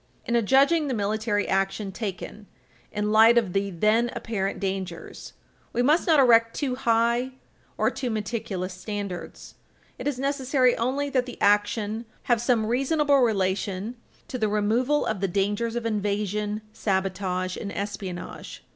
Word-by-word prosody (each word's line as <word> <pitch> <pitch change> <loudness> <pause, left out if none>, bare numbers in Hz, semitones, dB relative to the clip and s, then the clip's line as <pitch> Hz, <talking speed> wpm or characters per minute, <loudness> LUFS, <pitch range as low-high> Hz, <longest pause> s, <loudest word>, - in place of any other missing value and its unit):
In 235 - 0
adjudging 275 +7 +4
the 260 - -1
military 210 0 0
action 195 +1 -1
taken 205 0 -6 0.4
in 210 0 -1
light 225 +2 +7
of 210 -7 +1
the 200 0 0
then 215 +6 +2
apparent 195 -4 -3
dangers, 190 -3 -5 0.4
we 245 - +1
must 305 +8 +3
not 315 -3 +5
erect 230 -3 +5
too 275 -4 -1
high 235 +1 +1 0.4
or - - +2
too 265 -2 -3
meticulous 210 -4 -3
standards; 200 -1 -6 0.5
it - - -4
is 285 -3 -1
necessary 265 -2 +2
only 275 +4 -1
that 255 -2 +1
the 245 - -9
action 210 +2 +1 0.2
have 240 -4 +2
some 240 -3 +2
reasonable 280 +4 +2
relation 200 -1 0 0.3
to 255 - -5
the 215 -2 +1
removal 230 +8 +1
of 215 - -2
the 195 - 0
dangers 205 +5 -1
of 240 -1 -3
invasion, 210 0 -1
sabotage 185 -2 -1
and 200 - -5
espionage. 200 -3 -6
215 Hz, 145 wpm, -25 LUFS, 200-245 Hz, 0.5 s, light